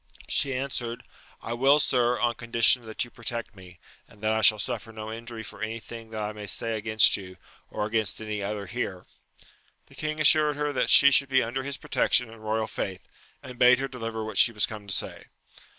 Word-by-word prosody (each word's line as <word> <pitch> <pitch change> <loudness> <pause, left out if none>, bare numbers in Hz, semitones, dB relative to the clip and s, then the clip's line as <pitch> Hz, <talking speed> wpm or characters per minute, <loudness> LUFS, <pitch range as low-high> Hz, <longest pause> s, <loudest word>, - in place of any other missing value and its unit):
She 135 -2 0
answered, 125 -3 -4 0.4
I 115 - -4
will, 135 +5 +4
sir, 125 -3 +1
on 120 -1 +1
condition 115 0 +2
that 110 +2 -2
you 120 - -17
protect 115 -1 -6
me, 90 -2 -15 0.3
and 105 - -20
that 110 0 +1
I 110 - 0
shall 110 0 +6
suffer 110 +2 -5
no 110 0 -7
injury 115 0 -7
for 100 - -11
any 110 +1 -4
thing 115 0 -11
that 110 -1 -5
I 105 - -3
may 105 -1 -9
say 115 +3 -2
against 110 0 +4
you, 95 -2 -11 0.3
or 105 - -3
against 110 -1 0
any 105 -1 -5
other 100 0 -4
here. 95 -4 -5 0.8
The - - -21
king 155 0 -4
assured 155 -1 +5
her 150 0 -2
that - - 0
she 140 0 +8
should 140 0 +3
be 130 -1 +3
under 120 +3 -3
his 140 +1 -5
protection 125 -2 +1
and 115 -1 -14
royal 110 +1 -1
faith, 95 -3 -6 0.4
and 125 -1 -11
bade 125 0 +6
her 135 +1 -3
deliver 115 -4 -6
what 110 -2 -2
she 120 - +6
was 105 -2 +1
come 105 -2 -10
to 100 - 0
say. - - -3
115 Hz, 215 wpm, -26 LUFS, 110-125 Hz, 0.8 s, she